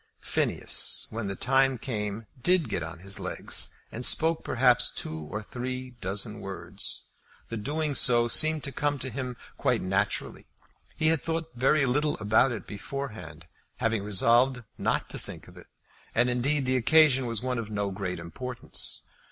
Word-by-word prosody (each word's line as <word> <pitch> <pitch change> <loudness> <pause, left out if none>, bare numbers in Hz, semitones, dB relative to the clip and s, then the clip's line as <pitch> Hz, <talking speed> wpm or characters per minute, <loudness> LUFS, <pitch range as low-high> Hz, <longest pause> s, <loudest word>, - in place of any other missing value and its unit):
Phineas, - - 0
when 110 -2 -3
the 100 - -3
time 135 +3 +2
came, 110 -3 -4 0.2
did 175 -2 +3
get 95 - -1
on 80 +1 -6
his 95 +3 -2
legs, - - 0 0.2
and 120 - -5
spoke 160 +5 +3
perhaps - - +3
two 80 0 -4
or 110 +4 -4
three 125 +3 -5
dozen 105 +3 -2
words. 95 0 -3 0.4
The 115 - -3
doing 150 +6 -1
so 120 -3 +4
seemed 155 +5 +4
to 140 - -3
come 145 +2 0
to 130 -1 -4
him 125 -2 -4 0.2
quite - - +1
naturally. 95 +2 -1 0.5
He 155 - +3
had 160 -4 +2
thought 165 0 -3
very 135 +4 +3
little 145 +4 +1
about 110 +5 +3
it 110 -6 -5
beforehand, 110 - -7 0.3
having 115 -2 0
resolved 120 +5 +3
not - - 0
to - - -6
think - - -9
of - - -15
it. - - -14 0.5
And 120 +2 +3
indeed 135 +3 +1
the 130 0 +2
occasion 135 0 +5
was 115 -1 -3
one 125 -2 -1
of 110 -2 -5
no 100 -2 -2
great 95 -1 -3
importance. 120 +10 -3
120 Hz, 165 wpm, -28 LUFS, 105-135 Hz, 0.5 s, occasion